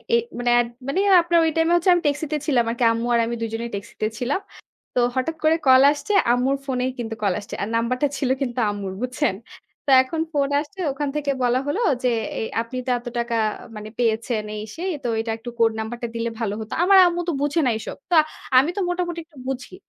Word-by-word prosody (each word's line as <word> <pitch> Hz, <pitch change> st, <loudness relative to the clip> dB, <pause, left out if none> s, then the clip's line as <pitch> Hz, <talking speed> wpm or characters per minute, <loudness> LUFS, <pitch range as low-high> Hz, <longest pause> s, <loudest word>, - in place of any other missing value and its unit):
এ -, -, +6 dB, 0.2 s
মানে 245 Hz, 0 st, 0 dB
এড 240 Hz, -, +1 dB, 0.2 s
মানে 345 Hz, +8 st, 0 dB, 0.2 s
আপনার 340 Hz, 0 st, +2 dB
ওই 320 Hz, -, +2 dB
time 325 Hz, +1 st, +3 dB
এ -, -, +5 dB
হচ্ছে 345 Hz, +2 st, +1 dB
আমি 350 Hz, -, +2 dB
ট্যাক্সিতে 295 Hz, +1 st, 0 dB
ছিলাম 255 Hz, -6 st, +3 dB
আরকি। 235 Hz, +1 st, -2 dB
আম্মু 230 Hz, +1 st, -2 dB
আর 235 Hz, -, +4 dB
আমি 235 Hz, +1 st, -3 dB
দুজনেই 230 Hz, +1 st, -3 dB
ট্যাক্সিতে 200 Hz, +2 st, -4 dB
ছিলাম। 270 Hz, +9 st, -1 dB, 0.6 s
তো -, -, +3 dB, 0.2 s
হঠাৎ 265 Hz, +5 st, -1 dB
করে 315 Hz, +1 st, +4 dB
call 260 Hz, 0 st, +8 dB
আসছে 355 Hz, +8 st, -3 dB, 0.2 s
আম্মুর 260 Hz, +3 st, +1 dB
phone 260 Hz, -2 st, -2 dB
এই 260 Hz, -, -1 dB
কিন্তু 225 Hz, -1 st, -4 dB
call 200 Hz, -3 st, +2 dB
আসছে। 205 Hz, -, -8 dB
আর 200 Hz, -, -1 dB
number 230 Hz, +2 st, +1 dB
টা 290 Hz, -, +4 dB
ছিল 260 Hz, -, -1 dB
কিন্তু 245 Hz, -2 st, -2 dB
আম্মুর, 200 Hz, -2 st, -4 dB
বুঝছেন? 255 Hz, -4 st, 0 dB, 0.5 s
তো -, -, -3 dB
এখন 320 Hz, +5 st, -5 dB
phone 285 Hz, -2 st, 0 dB
আসছে 315 Hz, +6 st, -8 dB
ওখান 285 Hz, +1 st, -3 dB
থেকে 290 Hz, -2 st, 0 dB
বলা 245 Hz, +1 st, +2 dB
হলো 380 Hz, +11 st, -1 dB, 0.2 s
যে 250 Hz, -, +3 dB, 0.3 s
"এ -, -, -2 dB, 0.2 s
আপনি 235 Hz, +2 st, -7 dB
তো -, -, 0 dB
এত 240 Hz, -, -12 dB
টাকা 235 Hz, 0 st, -1 dB, 0.4 s
মানে 210 Hz, 0 st, -7 dB
পেয়েছেন 225 Hz, -1 st, 0 dB
এই 210 Hz, -, -5 dB
সেই, 365 Hz, +3 st, -3 dB
তো -, -, -1 dB
এটা 225 Hz, 0 st, -2 dB
একটু 240 Hz, +2 st, -8 dB
code 225 Hz, -1 st, +3 dB
number 220 Hz, +2 st, -4 dB
টা -, -, 0 dB
দিলে 230 Hz, 0 st, -1 dB
ভালো 210 Hz, -3 st, -1 dB
হতো।" 215 Hz, 0 st, -6 dB
আমার 390 Hz, +1 st, +6 dB
আম্মু 350 Hz, 0 st, -1 dB
তো -, -, +2 dB
বোঝে 290 Hz, +3 st, +1 dB
না 245 Hz, -, +3 dB
এসব। -, -, -7 dB
তো -, -, +4 dB, 0.4 s
আমি 280 Hz, +6 st, +5 dB
তো -, -, +1 dB
মোটামুটি 350 Hz, -1 st, -2 dB
একটু 310 Hz, -4 st, -23 dB
বুঝি। 265 Hz, +7 st, -5 dB
255 Hz, 230 wpm, -23 LUFS, 230-305 Hz, 0.6 s, call